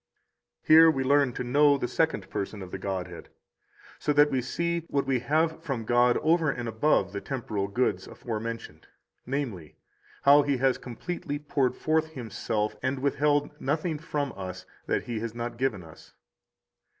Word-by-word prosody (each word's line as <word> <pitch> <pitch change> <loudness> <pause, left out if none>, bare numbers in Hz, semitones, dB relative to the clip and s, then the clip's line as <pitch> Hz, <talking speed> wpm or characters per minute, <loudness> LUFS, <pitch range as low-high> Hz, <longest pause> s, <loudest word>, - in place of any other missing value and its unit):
26 - - -28
Here 160 +1 +9
we 135 -4 0
learn 140 -1 +3
to 125 - -4
know 140 +3 +4
the 125 - -2
Second - - 0
Person 100 0 -4
of 90 - -10
the 95 - -5
Godhead, 90 -3 -5 0.7
so 150 - 0
that 145 0 +5
we 130 -2 +1
see 170 +6 -1
what 140 -1 0
we 135 -2 +1
have 160 +6 0
from 135 -8 -4
God 120 +1 +4
over 160 0 +3
and 120 -3 -3
above 110 -4 +1
the 100 - -4
temporal 110 -7 -3
goods 120 +6 -1
aforementioned; 115 -8 -6 0.4
namely, 120 - -4 0.5
how 145 +1 +7
He 140 -1 0
has 130 0 +2
completely 145 +4 -5
poured 140 -3 0
forth 160 0 0
Himself 110 -4 -3
and 130 +1 -1
withheld 145 +2 +1
nothing 155 +3 -1
from 145 -3 -3
us 95 -1 -7 0.2
that - - 0
He 115 -2 -4
has 115 0 -5
not 120 0 -4
given 120 -9 -1
us. 80 -1 -16
130 Hz, 165 wpm, -27 LUFS, 110-145 Hz, 0.7 s, Here